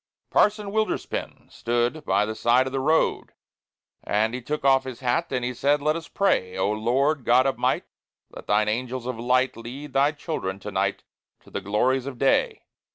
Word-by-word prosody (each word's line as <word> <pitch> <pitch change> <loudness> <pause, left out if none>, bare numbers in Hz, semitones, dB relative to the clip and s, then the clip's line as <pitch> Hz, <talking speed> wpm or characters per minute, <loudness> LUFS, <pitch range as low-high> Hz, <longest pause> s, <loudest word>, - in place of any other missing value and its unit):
Parson 210 -1 +2
Wilderspin 215 +1 -3
stood 120 +6 -1
by 100 +2 +2
the 110 - -4
side 120 +3 +3
of 130 - -5
the 135 - 0
road, 155 +4 +1 0.7
And 110 +2 0
he 125 - -4
took 150 +3 -4
off 135 -1 +5
his 130 -2 -8
hat, 130 +7 0
and 125 -2 -1
he 125 - -2
said, 145 +4 +2
"Let 150 +2 +1
us 165 -1 -6
pray! 95 - 0
O 95 +2 +1
Lord, 130 +7 +1
God 125 +3 +4
of 135 - -1
might, - - +1 0.5
let - - -11
thine 105 +1 +2
angels 125 +3 -2
of 125 -2 -4
light 125 +2 +2
Lead 125 +6 -8
thy 140 +2 +3
children 145 - -4
to - - -6
night - - -1 0.4
to - - -19
the 100 - -4
glories 125 +7 +1
of 135 -3 -6
day! 135 +2 +1
130 Hz, 190 wpm, -25 LUFS, 115-140 Hz, 0.7 s, off